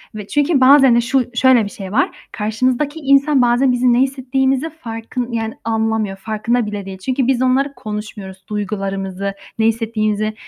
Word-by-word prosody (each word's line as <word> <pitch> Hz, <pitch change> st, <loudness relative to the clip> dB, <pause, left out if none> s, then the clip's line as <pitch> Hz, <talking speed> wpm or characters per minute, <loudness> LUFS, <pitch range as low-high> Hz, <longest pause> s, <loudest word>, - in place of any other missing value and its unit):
ve 210 Hz, -2 st, -7 dB
çünkü 290 Hz, +1 st, +1 dB
bazen 270 Hz, -2 st, +7 dB
de 235 Hz, -, +4 dB
şu 260 Hz, +2 st, +1 dB
şöyle 255 Hz, -3 st, +4 dB
bir 200 Hz, -, -5 dB
şey 190 Hz, -2 st, -8 dB
var, 260 Hz, +7 st, 0 dB
karşınızdaki 255 Hz, +8 st, -1 dB
insan 275 Hz, -1 st, +3 dB
bazen 245 Hz, +2 st, +3 dB
bizim 245 Hz, 0 st, +2 dB
ne 240 Hz, -, +3 dB
hissettiğimizi 265 Hz, +2 st, 0 dB
farkın 240 Hz, -4 st, -6 dB
yani 225 Hz, -1 st, -2 dB
anlamıyor, 220 Hz, -3 st, -1 dB
farkında 220 Hz, +4 st, -1 dB
bile 205 Hz, -2 st, -5 dB
değil. 190 Hz, -1 st, -7 dB
Çünkü 255 Hz, +6 st, -1 dB
biz 260 Hz, -2 st, +1 dB
onları 265 Hz, +2 st, +1 dB
konuşmuyoruz: 210 Hz, -3 st, -7 dB
duygularımızı, 195 Hz, -2 st, -3 dB, 0.3 s
ne 220 Hz, -, +3 dB
hissettiğimizi, 215 Hz, -1 st, 0 dB
235 Hz, 160 wpm, -18 LUFS, 210-265 Hz, 0.3 s, bazen